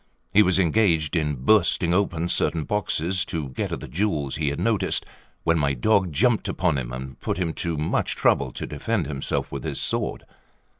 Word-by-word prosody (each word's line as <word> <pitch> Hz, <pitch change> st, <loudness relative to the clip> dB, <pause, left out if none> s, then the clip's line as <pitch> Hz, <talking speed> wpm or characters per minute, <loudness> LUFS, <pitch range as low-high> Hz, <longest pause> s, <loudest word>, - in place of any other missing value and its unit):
He 105 Hz, -, +7 dB
was 95 Hz, -3 st, +3 dB
engaged 85 Hz, -4 st, +2 dB
in 75 Hz, -3 st, 0 dB
bursting 85 Hz, +4 st, +3 dB
open 85 Hz, -3 st, 0 dB
certain 80 Hz, -2 st, +1 dB
boxes 95 Hz, -1 st, 0 dB
to 80 Hz, -6 st, -4 dB
get 65 Hz, -, -4 dB
at -, -, -4 dB
the -, -, -7 dB
jewels 75 Hz, -7 st, -1 dB
he 75 Hz, -, -1 dB
had 70 Hz, -, -4 dB
noticed, 105 Hz, -5 st, 0 dB, 0.4 s
when 85 Hz, 0 st, +2 dB
my 70 Hz, -2 st, +1 dB
dog 95 Hz, -, +2 dB
jumped 115 Hz, -, +2 dB
upon 85 Hz, -6 st, 0 dB
him, -, -, -5 dB
and 65 Hz, +1 st, -7 dB
put -, -, -2 dB
him 85 Hz, -3 st, -1 dB
to 85 Hz, -2 st, -2 dB
much 75 Hz, -, -1 dB
trouble -, -, +2 dB
to -, -, -5 dB
defend 95 Hz, +6 st, -2 dB
himself 70 Hz, -2 st, -3 dB
with 70 Hz, -2 st, -5 dB
his -, -, -2 dB
sword. -, -, -1 dB
85 Hz, 190 wpm, -24 LUFS, 75-95 Hz, 0.4 s, He